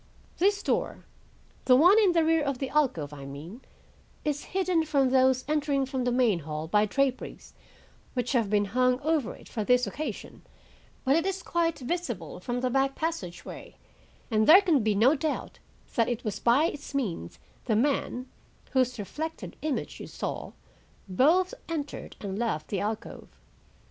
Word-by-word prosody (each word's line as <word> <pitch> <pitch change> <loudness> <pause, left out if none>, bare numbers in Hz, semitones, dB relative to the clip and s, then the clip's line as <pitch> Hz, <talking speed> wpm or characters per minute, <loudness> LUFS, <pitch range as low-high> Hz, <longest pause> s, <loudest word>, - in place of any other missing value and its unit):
This 405 +3 +2
door, - - -1 0.6
the 255 - +6
one 355 - +7
in 395 -5 +4
the 330 -2 +3
rear 325 0 +3
of 280 -2 -1
the 265 0 -3
alcove, 235 - +1
I 140 -2 -9
mean, 155 - -9 0.6
is 290 -1 -1
hidden 365 -3 +1
from 280 -4 +2
those 260 -1 +3
entering 290 -2 +1
from 260 -1 -3
the 245 - +1
main 240 -7 +3
hall 155 0 -5
by 210 +5 +3
draperies 270 +3 -2 0.6
which 245 -1 -1
have 230 -6 +1
been 205 0 +2
hung 250 0 +3
over 310 -4 0
it - - -15
for 220 - -3
this 250 +3 +3
occasion, 290 -9 -6 0.6
but 270 +2 +4
it 330 +3 +1
is 385 -2 -3
quite 335 -2 0
visible 245 - -4
from 245 +6 -3
the 255 -1 0
back 270 +1 +1
passageway, 315 - -5 0.6
and 215 0 +2
there 365 +6 +9
can 325 -9 +3
be 215 -1 +1
no 235 +8 +5
doubt 310 +1 -3 0.3
that 230 0 +2
it 240 -1 -3
was 215 -4 -3
by 245 +5 +4
its 290 -3 -5
means 185 - -3 0.3
the 225 - +1
man, 255 0 0 0.5
whose 255 -2 +1
reflected 315 +10 -5
image 305 -3 -3
you - - -7
saw, - - -5 0.5
both 320 - +3 0.2
entered 300 -3 -5
and 200 0 -4
left 220 -10 -2
the 200 - -1
alcove. 220 +2 -5
260 Hz, 165 wpm, -28 LUFS, 220-310 Hz, 0.6 s, there